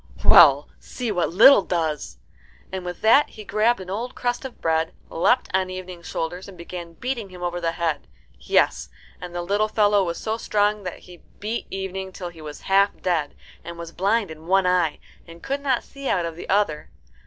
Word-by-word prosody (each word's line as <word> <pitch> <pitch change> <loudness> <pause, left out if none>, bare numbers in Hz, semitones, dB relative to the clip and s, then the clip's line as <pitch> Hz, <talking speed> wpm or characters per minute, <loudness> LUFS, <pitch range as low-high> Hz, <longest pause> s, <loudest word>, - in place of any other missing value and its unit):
Well, - - +8
see 245 -3 -5
what 175 -4 0
little 225 +7 +8
does!" 160 - -2 0.5
And 190 -1 -4
with 180 -1 -6
that 250 +7 +5
he 215 - -11
grabbed 215 +3 +1
an 185 0 -8
old 235 +5 -4
crust 245 +1 -2
of 265 -2 -8
bread, 160 0 0 0.2
leapt 245 +10 +2
on 190 -1 +1
Evening's 185 -2 -8
shoulders, 175 +3 -4
and 195 -2 -12
began 170 0 -8
beating 235 +1 -4
him 180 -1 -10
over 175 0 -2
the 165 -1 -1
head. 165 -3 -2 0.3
Yes, - - +1 0.3
and 175 -1 -8
the 175 - -2
little 205 +4 +1
fellow 205 -2 +3
was 170 -2 -3
so 220 +1 -2
strong 210 -2 0
he 175 -1 -15 0.2
beat 220 +3 -3
Evening 190 0 -5
till 180 -1 -6
he 165 -2 -14
was 150 -1 -9
half 195 +1 +2
dead, 165 -5 -1 0.3
and 170 0 -8
was 170 -1 -8
blind 200 +2 0
in 160 +1 -11
one 190 +1 +3
eye 180 -4 +2 0.3
and 165 0 -13
could 275 +1 -2
not 265 -3 0
see 275 -1 -7
out 175 -3 +1
of 165 -1 -5
the 170 - -9
other. 195 -6 +1
185 Hz, 195 wpm, -23 LUFS, 170-215 Hz, 0.5 s, Well